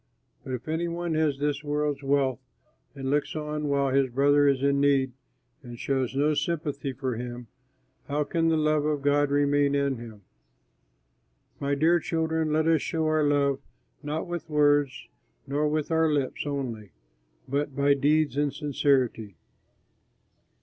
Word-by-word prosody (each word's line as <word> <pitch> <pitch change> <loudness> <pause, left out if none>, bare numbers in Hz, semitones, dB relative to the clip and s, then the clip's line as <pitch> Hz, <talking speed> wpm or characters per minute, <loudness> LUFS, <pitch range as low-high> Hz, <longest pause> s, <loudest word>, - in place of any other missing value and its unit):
But 130 - -6
if 125 +2 -6
any 160 +2 -1
one 170 0 -3
has 155 -3 +1
this 145 +1 -1
world's 150 -1 -1
wealth 135 -3 +1 0.6
and 135 0 -3
looks 145 +2 0
on 150 -1 -3
while 140 -2 +1
his 135 -1 +3
brother 145 +3 +3
is 135 -1 +2
in 140 0 +2
need 135 -2 +3 0.5
and 120 -3 -10
shows 130 0 -1
no 150 +2 +2
sympathy 145 -4 -2
for 130 -2 -3
him, 120 0 -6 0.6
how 150 +1 0
can 165 +2 0
the 160 - +2
love 155 -1 +2
of 150 -2 -1
God 145 0 +3
remain 145 0 +2
in 140 -2 0
him? 110 -3 -11 1.4
My 140 0 0
dear 165 +4 +3
children, 160 -1 -1
let 155 +1 +2
us 160 -3 +3
show 160 -1 -1
our 155 0 +2
love 140 -2 +2 0.4
not 150 +2 -3
with 175 -2 -6
words 145 -2 +2 0.4
nor 145 +2 0
with 155 +1 -1
our 160 -1 +3
lips 145 0 -1
only, 120 -8 -4 0.5
but 140 0 -2
by 140 0 +3
deeds 145 +1 +1
and 145 -1 +1
sincerity. 135 - 0
145 Hz, 155 wpm, -27 LUFS, 135-150 Hz, 1.4 s, his